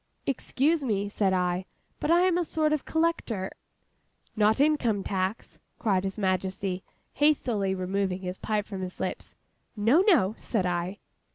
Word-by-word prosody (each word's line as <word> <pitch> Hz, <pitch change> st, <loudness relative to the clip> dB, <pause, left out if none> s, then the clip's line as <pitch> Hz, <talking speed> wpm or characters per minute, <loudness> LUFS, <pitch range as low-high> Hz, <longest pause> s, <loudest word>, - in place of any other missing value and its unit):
'Excuse 280 Hz, +3 st, +1 dB
me,' 205 Hz, -5 st, 0 dB
said 200 Hz, -1 st, +1 dB
I; 180 Hz, 0 st, 0 dB, 0.3 s
'but 295 Hz, -, -2 dB
I 340 Hz, +1 st, +5 dB
am 365 Hz, -1 st, +3 dB
a 350 Hz, -, +2 dB
sort 310 Hz, -1 st, +1 dB
of 300 Hz, -, -1 dB
collector—' 320 Hz, -, 0 dB, 0.8 s
''Not 215 Hz, +2 st, +3 dB
Income 260 Hz, -9 st, +2 dB
tax?' 190 Hz, +2 st, -3 dB, 0.2 s
cried 195 Hz, -3 st, +1 dB
His 195 Hz, -, -3 dB
Majesty, 190 Hz, -1 st, -1 dB, 0.3 s
hastily 240 Hz, -10 st, +2 dB
removing 190 Hz, 0 st, -1 dB
his 180 Hz, 0 st, -5 dB
pipe 210 Hz, -1 st, -1 dB
from 195 Hz, -3 st, -6 dB
his 185 Hz, 0 st, -6 dB
lips. -, -, -4 dB, 0.4 s
'No, 230 Hz, -, +4 dB
no,' 215 Hz, -, +5 dB
said 210 Hz, -6 st, -1 dB
I. 180 Hz, +2 st, -1 dB
205 Hz, 150 wpm, -28 LUFS, 190-280 Hz, 0.8 s, I